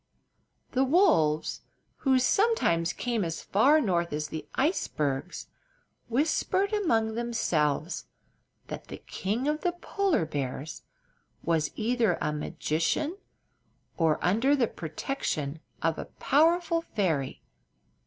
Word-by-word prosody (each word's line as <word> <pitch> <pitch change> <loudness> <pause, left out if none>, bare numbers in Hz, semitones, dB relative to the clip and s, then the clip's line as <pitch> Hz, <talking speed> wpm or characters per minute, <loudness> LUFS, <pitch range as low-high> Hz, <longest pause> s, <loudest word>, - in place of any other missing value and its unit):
The 260 - +2
wolves, 265 - +3 0.4
who 265 -2 +3
sometimes 250 - +2
came 235 -2 -1
as 165 -1 -4
far 275 +10 +4
north 175 - 0
as 150 0 -2
the 160 - -6
icebergs, 155 - -1 0.6
whispered 320 - +1
among 225 - +1
themselves 175 -10 -1 0.6
that - - -8
the - - -7
King 220 +8 -3
of 300 +1 0
the 355 - 0
Polar 365 - 0
Bears 145 0 -4 0.6
was 160 -2 +1
either 225 -5 +1
a 150 - -1
magician 165 - -1 0.8
or 160 -3 +2
under 230 +10 +3
the 260 -4 +3
protection 160 - -3 0.2
of 165 -1 +1
a - - -4
powerful 330 +3 +2
fairy. 165 - -2
220 Hz, 110 wpm, -28 LUFS, -, 0.8 s, far